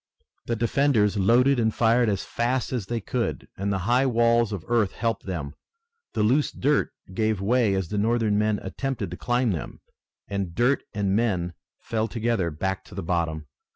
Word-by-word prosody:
The 115 - 0
defenders 115 -2 +2
loaded 120 +7 +4
and 110 -1 +2
fired 115 +1 +3
as 100 -2 -1
fast 125 +2 -1
as 115 -7 -2
they 120 +1 -1
could 115 +2 -2
and 100 +1 -2
the 100 - +1
high 125 +4 +3
walls 115 -2 +3
of 95 -6 -5
earth 115 -5 +2
helped 115 -1 -2
them. 75 -7 -4 0.6
The 105 - +2
loose 130 +7 +2
dirt 145 +2 +1 0.2
gave 110 0 0
away 110 0 +2
as 95 -3 -2
the 105 - -1
Northern 110 -1 +2
men 105 0 +1
attempted 135 -2 -3
to - - -6
climb 120 -1 +1
them, 85 - -5 0.5
and 95 -4 -3
dirt 125 +6 +2
and 100 -2 +1
men 95 -7 0 0.3
fell 110 -1 -1
together 115 -6 0
back 95 +5 -3
to - - -13
the - - -4
bottom. 80 -2 -1
110 Hz, 180 wpm, -25 LUFS, 95-120 Hz, 0.6 s, loaded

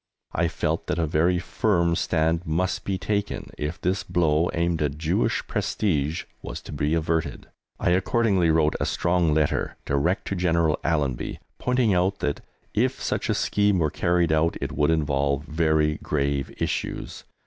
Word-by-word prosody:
I 85 +1 +2
felt - - -2
that - - -1
a 85 - +1
very 80 +4 +2
firm 85 0 +1
stand 80 0 +1
must 90 +4 -1
be 95 -1 -1
taken 100 +1 -2
if 75 +2 -4
this 90 +3 0
blow 80 -1 +1
aimed 85 -1 0
at 75 -1 -1
Jewish 80 +3 0
prestige 80 -5 -1 0.2
was - - -6
to - - -9
be 75 +2 0
averted. 80 0 -1 0.3
I - - +2
accordingly 95 -1 +2
wrote 80 -1 +3
a - - 0
strong 85 -2 +1
letter 75 -1 +1
direct 70 +7 0
to 100 - -1
General 85 -3 +2
Allenby, 75 -6 -1 0.2
pointing 125 -4 +2
out 95 +2 +1
that, 75 - -2 0.3
if - - +1
such - - -2
a - - +2
scheme 105 -1 +2
were 80 -4 +1
carried 85 -1 +1
out, 80 +2 +2
it - - -3
would 75 +1 +1
involve 70 -3 +1
very 80 -1 +1
grave 70 -2 -1
issues. - - -3
80 Hz, 160 wpm, -25 LUFS, 75-90 Hz, 0.3 s, wrote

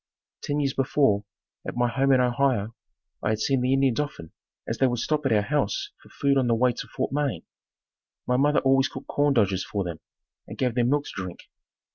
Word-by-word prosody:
Ten 145 0 -2
years 140 -2 0
before, 125 -6 +2 0.4
at - - -5
my 120 0 +2
home 135 +3 +1
in 130 - +5
Ohio, 120 -3 +1 0.5
I - - -1
had 110 0 0
seen 135 +2 +1
the 125 +1 +1
Indians 135 -2 +2
often 145 - -4 0.4
as 115 - -3
they 135 - +4
would 120 -1 -1
stop 150 +4 0
at - - -1
our 105 -2 +3
house 135 -4 -1
for - - -18
food 140 -1 +1
on 130 - +1
the 115 - +3
way 125 +2 +3
to - - -7
Fort - - -3
Wayne. 140 - -1 0.8
My 125 - +1
mother 145 +3 +3
always 135 0 +3
cooked - - -9
corn 145 -1 +1
dodgers 100 -4 +2
for 100 -2 -3
them 85 -3 -6 0.5
and - - -9
gave 125 -2 0
them 120 0 +1
milk 145 +1 +2
to - - -8
drink. 90 -3 -6
125 Hz, 215 wpm, -25 LUFS, 110-140 Hz, 0.8 s, in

